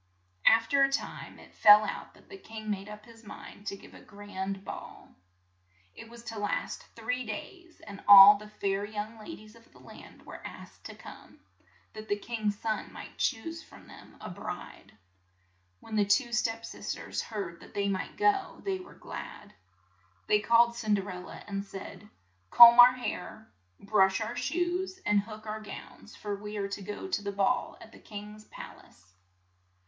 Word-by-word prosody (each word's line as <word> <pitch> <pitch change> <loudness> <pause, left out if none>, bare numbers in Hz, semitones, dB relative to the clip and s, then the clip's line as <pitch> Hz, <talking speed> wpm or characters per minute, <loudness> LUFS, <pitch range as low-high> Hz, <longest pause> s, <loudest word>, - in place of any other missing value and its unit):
Aft 225 +3 +5
er 280 -1 +5
a 275 - -2
time 275 - -4
it - - -16
fell 210 0 +8
out - - -6
that - - -21
the 395 - -11
king 220 - -7
made 200 0 -4
up 210 0 -10
his 230 -1 -16
mind 205 0 -11
to 195 - -3
give - - -16
a - - -13
grand 195 -1 -6
ball. - - -9 0.8
It 225 - -12
was 235 0 -13
to 225 -2 -6
last 205 - -3
three 250 +3 -2
days, 335 - -8
and 200 0 -11
all 200 0 +11
the 210 +1 -10
fair 200 -1 -2
young 215 +2 -6
la 215 - -11
dies 215 0 -10
of 230 0 -20
the - - -19
land - - -14
were - - -10
asked - - -11
to - - -10
come, - - -14 0.5
that 215 0 -9
the 205 - 0
king's 210 -1 -3
son 215 -1 -3
might - - -11
choose 325 +7 -2
|rom - - -15
them - - -15
a - - -8
bride. - - -8 0.9
When 220 - -7
the 210 - +4
two 240 +5 +2
s£ep 230 -1 -1
sis - - -5
ters - - -4
heard 195 -6 -6
that - - -16
they 200 0 0
might 195 -2 -3
go, 405 -2 +1
they 385 -1 -1
were 365 - -13
glad. 205 - -9 0.7
They 210 - +3
called 235 +2 +4
Cin 215 -3 +1
der 200 0 -3
el 180 0 -7
la, - - -10
and 195 -1 -4
said, 200 +1 -10 0.4
"Comb 235 - +10
our 245 +1 +10
hair, 230 -3 -6 0.3
brush 195 -2 +3
our 225 +2 -4
shoes, 355 +6 -2
and 210 0 +4
hook 215 +1 -8
our 215 0 -5
gowns, 215 0 -11
for 205 -1 -4
we 210 +1 -7
are 200 -1 -2
to 200 0 -5
go 205 - -6
to 370 - -1
the 200 0 -4
ball 200 +6 0
at 220 - -14
the - - -15
king's 210 0 -10
pal - - -11
ace." 95 0 -25
215 Hz, 190 wpm, -29 LUFS, 205-235 Hz, 0.9 s, all